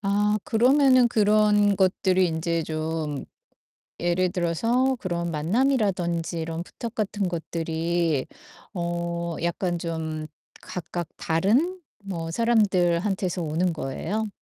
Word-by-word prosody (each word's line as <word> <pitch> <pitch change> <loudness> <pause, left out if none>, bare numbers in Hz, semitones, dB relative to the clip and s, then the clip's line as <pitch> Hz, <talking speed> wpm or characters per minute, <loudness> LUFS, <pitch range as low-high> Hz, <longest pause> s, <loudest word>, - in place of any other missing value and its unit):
아 205 +1 +1
그러면은 255 +1 +5
그런 210 -2 +3
것들이 185 -1 +3
인제 165 0 -1
좀 155 -2 -3 0.8
예를 175 +1 +1
들어서 230 +10 +1
그런 170 -2 -2
만남이라든지 175 - 0
이런 165 +1 -3
부탁 230 +5 -7
같은 205 -3 -1
것들이 165 -2 -1 0.5
어 170 -1 -2
약간 175 0 -1
좀 160 -2 -4 0.3
각각 175 -1 -5
다른 240 - +1 0.2
뭐 165 -4 -4
사람들한테서 190 -4 +1
오는 165 +3 0
거예요? 165 +9 -3
175 Hz, 230 characters per minute, -25 LUFS, 165-210 Hz, 0.8 s, 그러면은